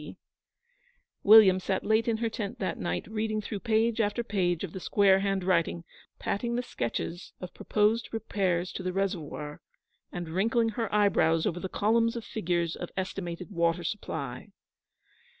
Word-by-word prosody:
C.' - - -10 1.0
William 205 -3 +8
sat 190 +1 -2
late 220 +2 +2
in 230 -1 +1
her 230 +1 -1
tent 215 +2 -4
that 195 -5 -3
night, 85 -1 -2
reading 215 0 -2
through 210 -1 -5
page 225 +2 +1
after 205 +2 0
page 185 -6 0
of 185 - -5
the 190 - -5
square 195 0 +4
handwriting, 185 -4 0 0.3
patting 235 +4 -2
the 245 - -1
sketches 170 - -4
of 180 - -8
proposed 215 +2 +1
repairs 190 -5 -1
to - - -6
the 185 0 -3
reservoir, 165 -6 -3 0.5
and 175 -2 -5
wrinkling 225 +6 +1
her 225 0 -3
eyebrows 165 -6 +3
over 175 - -1
the 190 - -4
columns 230 +4 +2
of 230 -2 -5
figures 175 -5 -1
of 175 - -6
estimated 185 -1 -4
water 170 -1 +1
supply. 150 - -4
195 Hz, 155 wpm, -29 LUFS, 175-220 Hz, 1.0 s, William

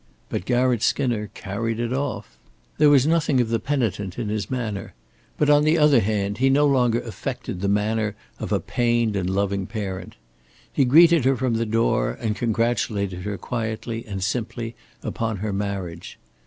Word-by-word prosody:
But 90 - -3
Garratt 125 -2 +2
Skinner 120 -5 +1
carried 115 +3 -3
it 120 +1 -1
off. 130 - -4 0.4
There 150 -1 +7
was 140 -2 +5
nothing 155 -4 +2
of 120 -2 +1
the 115 0 +1
penitent 105 -9 -2
in 115 -4 -3
his 105 -1 -2
manner, 110 - -4 0.4
but 150 - +2
on 145 0 +5
the 155 +2 +3
other 150 -4 +5
hand 100 -1 -1
he 135 +1 +4
no 145 +2 +4
longer 125 -4 +3
affected 105 -5 -5
the 100 - 0
manner 105 +1 0 0.2
of - - -5
a - - +2
pained 120 -3 0
and 95 -2 -1
loving 100 0 -1
parent. 100 -4 -5 0.6
He 135 - +3
greeted 165 +3 +6
her 135 0 +3
from 125 0 0
the 115 0 0
door, 115 +1 +1
and 110 -3 -1
congratulated 110 -5 0
her 100 +2 -4
quietly 115 0 -4
and 95 -2 -4
simply 115 +2 -3 0.3
upon 110 -2 -2
her 105 +1 -3
marriage. 95 -4 -4
115 Hz, 170 wpm, -23 LUFS, 100-125 Hz, 0.6 s, There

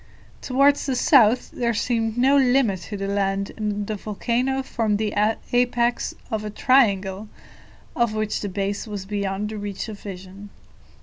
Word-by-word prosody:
Towards 280 +2 +3
the 265 - 0
south 245 -3 +4
there 235 -2 -1
seemed 225 0 -1
no 265 +3 +4
limit 250 -8 +3
to 205 - -4
the 195 0 -3
land, 195 0 -1
and 210 -1 -2
the 215 - -3
volcano 240 +6 -1
formed 225 -5 -1
the 215 0 -2 0.4
apex 245 -1 +1 0.2
of 220 -1 -2
a 210 - -4
triangle, 205 -4 +2 0.7
of 235 -3 +1
which 215 -1 -1
the 205 - -3
base 200 +3 -3
was 205 -3 -5
beyond 200 0 -2
the 215 -1 -6
reach 205 +1 -5
of 210 -2 -8
vision. 195 +1 -9
215 Hz, 160 wpm, -23 LUFS, 200-245 Hz, 0.7 s, south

